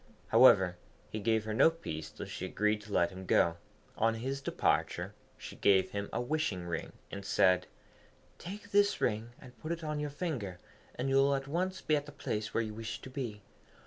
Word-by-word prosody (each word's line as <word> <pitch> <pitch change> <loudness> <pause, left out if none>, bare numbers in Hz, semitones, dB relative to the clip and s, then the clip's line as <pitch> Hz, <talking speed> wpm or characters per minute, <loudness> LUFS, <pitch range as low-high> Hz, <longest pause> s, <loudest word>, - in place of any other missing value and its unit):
However, 90 -2 +6 0.3
he 110 - -3
gave 110 +1 +2
her 110 - -2
no 130 +8 +6
peace 80 - -6
till - - -8
she - - -5
agreed 105 0 +1
to 105 0 -12
let 85 -2 +2
him 95 0 -9
go. 85 0 +3 0.4
On 115 0 +2
his 135 +4 -3
departure - - 0 0.2
she - - -9
gave 95 -2 +4
him 100 0 -3
a - - -1
wishing 125 - -1
ring, 85 -1 -4 0.2
and 100 - -6
said, 90 -2 +3 0.7
'Take 205 +3 -8
this 205 0 +4
ring, 115 +1 -1
and 125 -2 -13
put 155 - -5
it 170 -1 -3
on 150 -1 -2
your 150 0 -2
finger, 140 - -3 0.4
and 125 - -2
you 135 0 +3
will 140 +1 +4
at 135 0 -4
once 185 +5 -1
be 155 - +2
at 145 0 -2
the - - -8
place 105 -6 -3
where 115 - +1
you 110 -1 -5
wish 110 +1 -5
to 130 - -10
be. 115 -7 -5
115 Hz, 205 wpm, -32 LUFS, 100-150 Hz, 0.7 s, However